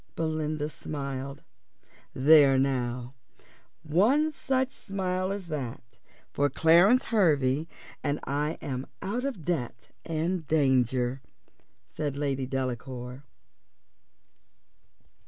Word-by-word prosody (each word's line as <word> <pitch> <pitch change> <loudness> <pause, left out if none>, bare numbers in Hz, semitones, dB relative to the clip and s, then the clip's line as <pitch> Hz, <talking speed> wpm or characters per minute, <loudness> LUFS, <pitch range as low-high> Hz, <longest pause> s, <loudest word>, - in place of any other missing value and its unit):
Belinda 155 -2 -1
smiled. 140 -2 -6 0.7
"There 140 0 +6
now; 125 -2 -1 0.7
one 225 - +3
such 265 -2 -1
smile 185 -1 -2
as 200 -2 -4
that 120 -6 -6 0.3
for 145 0 +2
Clarence 175 - +5
Hervey, 155 - +3 0.4
and 145 0 0
I'm 140 -2 -3 0.2
out 235 +7 -2
of 245 - -4
debt 125 -9 -3
and 165 +1 -2
danger," 130 -3 +2 0.7
said 145 -2 -4
Lady 135 -2 -1
Delacour. 130 0 -4
145 Hz, 85 wpm, -28 LUFS, 130-175 Hz, 0.7 s, There